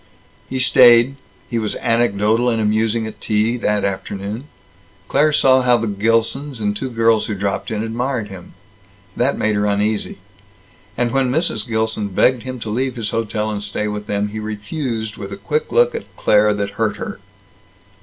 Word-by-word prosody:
He 130 - -3
stayed. 125 0 +6 0.3
He 115 - -2
was 110 -2 -2
anecdotal 115 0 +1
and 115 -2 0
amusing 110 +1 +1
at 110 -1 -9
tea, 110 +2 +1
that 105 -3 0
afternoon. 100 +4 -4 0.6
Claire 150 +6 +3
saw 130 -2 +4
how 125 -1 +4
the 115 - -2
Gilsons, 115 +6 0
and 105 -1 -1
two 130 +5 -3
girls 115 -2 +2
who 105 - -2
dropped 100 0 -2
in, 110 -1 -2
admired 120 0 -2
him. 95 -3 -11 0.6
That 125 +3 +1
made 110 - +1
her 105 0 +1
uneasy. 105 +1 -1 0.8
And 120 -1 +1
when 135 0 +1
Mrs. 130 -6 0
Gilson 110 -2 -1
begged 120 +5 +2
him 130 0 -6
to 110 - -5
leave 130 +3 -1
his 115 -3 -3
hotel 110 -1 -2
and 105 -1 -3
stay 105 +1 -2
with 105 0 -5
them, 105 0 -1
he 110 +1 -6
refused 110 +1 -4
with 100 -2 -7
a 100 - -6
quick 150 +10 -2
look 485 0 +4
at 460 - -5
Claire 105 0 +3
that 100 -1 -2
hurt 110 -2 +1
her. - - -6
110 Hz, 175 wpm, -19 LUFS, 105-125 Hz, 0.8 s, stayed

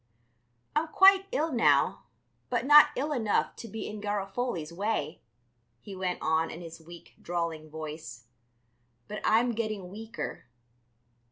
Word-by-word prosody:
"I'm 310 +2 +1
quite 385 +3 +6
ill 315 +3 0
now, 240 - +2 0.4
but 245 0 0
not 295 +1 +9
ill 290 +4 -2
enough 225 -7 0
to 230 - -8
be 225 0 -6
in 210 -1 -7
Garofoli's 200 -4 -3
way," 180 -5 -2 0.6
he 195 - -10
went 185 -1 -2
on 160 +1 +1
in 165 - -8
his 165 -1 -10
weak, 170 +1 -13
drawling 165 -3 -3
voice, 150 -6 -8 0.8
"but 210 - -6
I'm 230 +3 +3
getting 215 -5 -3
weaker. 225 +3 -7
205 Hz, 135 wpm, -29 LUFS, 165-240 Hz, 0.8 s, not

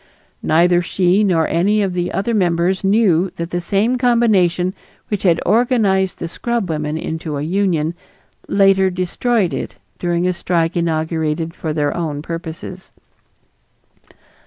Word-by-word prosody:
Neither 175 +2 +3
she 180 +3 +2
nor 170 -5 +2
any 205 +5 +2
of 190 -2 -2
the 175 0 -2
other 215 +4 -1
members 180 -1 +1
knew 195 -3 +3
that 170 0 -5
the 175 - -2
same 210 +8 +1
combination 200 -8 +2 0.4
which 205 -3 -2
had 170 -4 +3
organized 210 -6 +2
the 170 - -4
scrubwomen 165 -8 -2
into 160 -2 -4
a 140 - -3
union 170 -2 0 0.5
later 195 -1 +4
destroyed 185 +2 0
it - - -5 0.2
during 175 0 0
a 185 - +1
strike 170 -1 -1
inaugurated 160 -1 -1
for 160 - -4
their 150 -1 -1
own 150 -4 -3
purposes. 165 +3 -7
180 Hz, 135 wpm, -18 LUFS, 165-195 Hz, 0.5 s, later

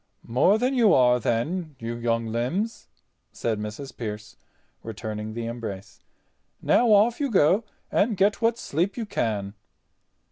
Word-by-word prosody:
"More 140 - +3
than 250 +4 0
you 235 -6 +5
are 125 -1 +4
then, 150 +8 -2
you 115 -1 -5
young 115 -1 -1
limbs," 125 - -2 0.4
said 110 -3 -2
Mrs. 105 +6 -7
Pearce, 105 -2 -6 0.5
returning 110 -1 -6
the 115 -1 -3
embrace. 115 -5 -7 0.6
"Now 240 -2 +3
off 215 +3 +4
you 285 -2 0
go, 195 +1 +3 0.3
and 210 -1 +1
get 200 +3 +2
what 230 0 +2
sleep 180 - -2
you 230 - -2
can." 105 - -2
125 Hz, 140 wpm, -25 LUFS, -, 0.6 s, you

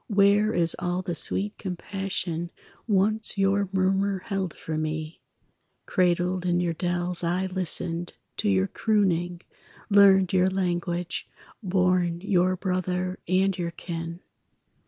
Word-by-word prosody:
Where 205 0 +4
is 170 -5 +3
all 175 +1 -2
the 180 -2 -3
sweet 200 +5 -1
compassion 180 -2 -3 0.4
Once 215 +1 +1
your 195 0 +2
murmur 195 +1 +1
held 195 -4 -2
for 160 - -5
me? 155 +1 -4 0.6
Cradled 180 0 +1
in 175 -1 +1
your 175 -1 0
dells, 175 +1 0
I 180 +3 0
listened 175 -2 -1 0.2
To - - +1
your 95 -1 +3
crooning, 175 - 0 0.5
learned 195 -2 +6
your 185 0 +4
language, 175 -2 -2 0.3
Born 180 -3 +1
your 185 -2 +2
brother 185 0 -2
and 190 +2 +2
your 175 -2 -2
kin. 170 0 -6
180 Hz, 120 wpm, -26 LUFS, 175-195 Hz, 0.6 s, learned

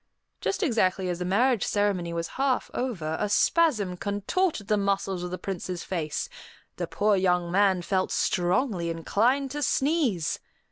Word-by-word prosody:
Just 390 +1 -1
exactly 190 - +1
as 175 -1 -2
the 180 - -2
marriage 230 +4 +2
ceremony 200 -4 0
was 170 0 -3
half 270 -1 0
over, 170 -12 -2
a 210 - 0
spasm 215 - +2
contorted 205 - -1
the 210 - +3
muscles 195 -2 0
of 180 - -4
the 180 - -4
Prince's 185 -2 -4
face; 160 -5 -3 0.5
the - - -2
poor 210 0 +2
young 180 -2 +1
man 190 -1 +3
felt 190 +1 0
strongly 180 0 0
inclined 235 - +1
to 295 +1 -4
sneeze. 270 - +1
195 Hz, 150 wpm, -27 LUFS, 180-245 Hz, 0.5 s, the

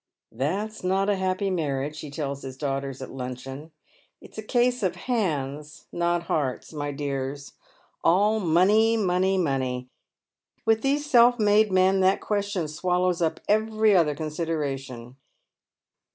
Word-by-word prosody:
"That's 200 +11 -3
not 195 +2 +1
a - - +2
happy 190 +1 -1
marriage," 150 -3 -2
he 150 - -7
tells 140 -1 -4
his 130 -1 -8
daughters 135 -1 -3
at - - -9
luncheon, 135 +4 -7 0.2
" - - -36
it's - - -12
a - - -3
case 245 +2 +1
of 185 -3 0
hands, 150 - -3
not 175 0 0
hearts, 145 -3 -2
my 145 -1 -3
dears. 140 -1 -4 0.5
All 205 +5 +3
money, 205 +6 +3
money, 190 -1 +1
money! 130 -6 -1 0.8
with 225 0 +3
these 285 +3 0
self 245 -3 +5
made 210 -1 +3
men 190 +1 +3
that 190 +1 +3
question 200 -5 -2
swallows 180 +3 0
up 160 -2 0
every 215 0 +3
other 155 -5 +3
consideration." 140 -6 -4
175 Hz, 140 wpm, -25 LUFS, 140-205 Hz, 0.8 s, self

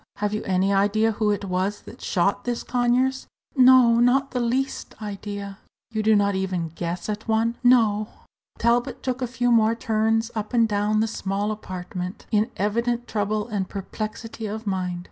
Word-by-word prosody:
"Have 210 0 -2
you 215 - -1
any 190 +1 +2
idea 205 +3 +3
who 215 0 0
it 205 -1 -1
was 190 +2 -1
that - - -13
shot 195 +3 0
this 240 -1 -2
Conyers?" 250 +2 +1 0.3
"No, 255 -3 +6
not 265 +3 +3
the 250 - -1
least 250 +2 -2
idea." 200 -1 -6 0.3
"You 220 -1 -1
do 215 0 +4
not 200 -1 +2
even 185 -3 -2
guess 170 +2 -4
at 210 0 -4
any - - -23
one?" 225 +1 +1
"No." 220 -4 +4 0.5
Talbot 240 +2 +1
took 255 0 -2
a 250 - 0
few 245 0 0
more 225 -1 +4
turns 225 0 0
up 215 +2 -4
and 230 -1 +4
down 210 +1 +1
the 225 - +1
small 200 0 -2
apartment, 185 -2 -6
in 215 +2 +2
evident 235 +4 0
trouble 210 0 -1
and 200 -5 -3
perplexity 215 +3 -5
of 220 +2 -5
mind. 185 -3 -2
215 Hz, 175 wpm, -24 LUFS, 200-235 Hz, 0.5 s, No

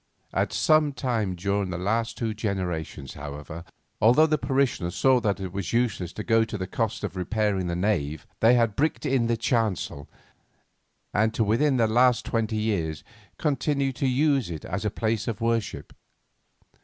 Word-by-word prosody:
At - - 0
some 155 -2 +3
time 115 -9 -1
during 100 +2 -1
the 90 - -3
last 115 +5 -1
two 115 -2 -2
generations, 90 - -3
however, 75 +2 -7 0.4
although 125 +9 +6
the 155 -2 +1
parishioners 130 -10 0
saw 130 -1 +4
that 105 -4 0
it 95 -2 -5
was 100 0 -4
useless 110 -7 0
to 110 - -5
go 115 0 +3
to 110 -1 -4
the 95 - -3
cost 110 +3 -2
of 100 -2 -4
repairing 95 0 0
the 85 - -2
nave, 85 -6 -1
they 115 +2 +5
had 115 -4 +2
bricked 155 +2 0
in 130 -3 +2
the 115 0 +1
chancel, 110 - -1 1.0
and 110 +1 +2
to 115 - +2
within 130 +6 +2
the 115 - +4
last 120 +2 +3
twenty 110 -1 -1
years 85 -8 -1 0.3
continued 140 -2 0
to 135 - +1
use 135 - +2
it 80 -3 -6
as 100 +4 -3
a - - +2
place 110 +1 -1
of 115 -3 -3
worship. 115 -2 -2
110 Hz, 170 wpm, -26 LUFS, 95-120 Hz, 1.0 s, although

